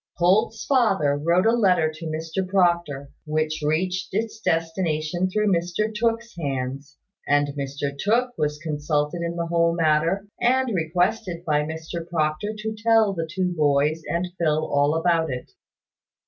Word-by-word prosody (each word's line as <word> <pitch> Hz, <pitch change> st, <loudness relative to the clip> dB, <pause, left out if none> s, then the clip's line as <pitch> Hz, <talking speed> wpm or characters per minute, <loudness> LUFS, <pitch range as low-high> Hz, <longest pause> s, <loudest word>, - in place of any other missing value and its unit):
Holt's 210 Hz, +6 st, +2 dB
father 195 Hz, -, +2 dB
wrote 170 Hz, +6 st, +2 dB
a 225 Hz, -, +5 dB
letter 185 Hz, -9 st, +3 dB
to 160 Hz, +1 st, -7 dB
Mr 160 Hz, +4 st, -3 dB
Proctor, 170 Hz, -7 st, +1 dB, 0.2 s
which 155 Hz, +1 st, -1 dB
reached 180 Hz, +5 st, 0 dB
its 220 Hz, +1 st, -2 dB
destination 165 Hz, +1 st, 0 dB
through 210 Hz, +1 st, +1 dB
Mr 180 Hz, +6 st, -1 dB
Tooke's 230 Hz, +2 st, -1 dB
hands; 135 Hz, -1 st, -4 dB, 0.3 s
and 145 Hz, 0 st, +3 dB
Mr 140 Hz, 0 st, -4 dB
Tooke 235 Hz, -, +1 dB
was 150 Hz, 0 st, -1 dB
consulted 150 Hz, +1 st, -2 dB
in 170 Hz, 0 st, -3 dB
the 170 Hz, 0 st, -2 dB
whole 170 Hz, 0 st, +2 dB
matter, 165 Hz, +4 st, +2 dB, 0.2 s
and 255 Hz, 0 st, +2 dB
requested 175 Hz, +1 st, -1 dB
by 150 Hz, -2 st, +2 dB
Mr 160 Hz, +2 st, -6 dB
Proctor 155 Hz, +4 st, -1 dB
to 220 Hz, +1 st, -4 dB
tell 220 Hz, -1 st, +3 dB
the 165 Hz, -3 st, -4 dB
two 185 Hz, 0 st, -1 dB
boys 150 Hz, +1 st, +2 dB
and 170 Hz, +2 st, -1 dB
Phil 155 Hz, -2 st, +1 dB
all 145 Hz, +2 st, +2 dB
about 165 Hz, -1 st, +2 dB
it. 125 Hz, -2 st, -6 dB
170 Hz, 145 wpm, -24 LUFS, 155-190 Hz, 0.3 s, a